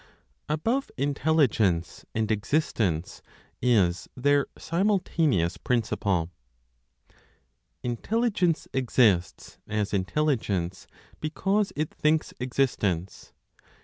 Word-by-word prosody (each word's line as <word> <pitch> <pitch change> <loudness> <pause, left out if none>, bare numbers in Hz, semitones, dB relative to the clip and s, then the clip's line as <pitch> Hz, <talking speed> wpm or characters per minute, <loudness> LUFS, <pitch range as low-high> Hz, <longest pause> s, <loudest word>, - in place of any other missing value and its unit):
ABOVE 225 - 0
INTELLIGENCE 130 - +1
AND 110 -1 0
EXISTENCE 105 - 0 0.4
IS 100 -8 +2
THEIR 145 +2 +3
SIMULTANEOUS 165 - +1
PRINCIPLE. 105 -7 0 1.6
Intelligence 180 - 0
exists 110 - +1
(as 105 -1 -2
intelligence) 100 - -1 0.3
because 195 +6 0
it 155 +1 -2
thinks 155 +1 +1
existence. 110 -9 -1
125 Hz, 70 wpm, -27 LUFS, 100-155 Hz, 1.6 s, THEIR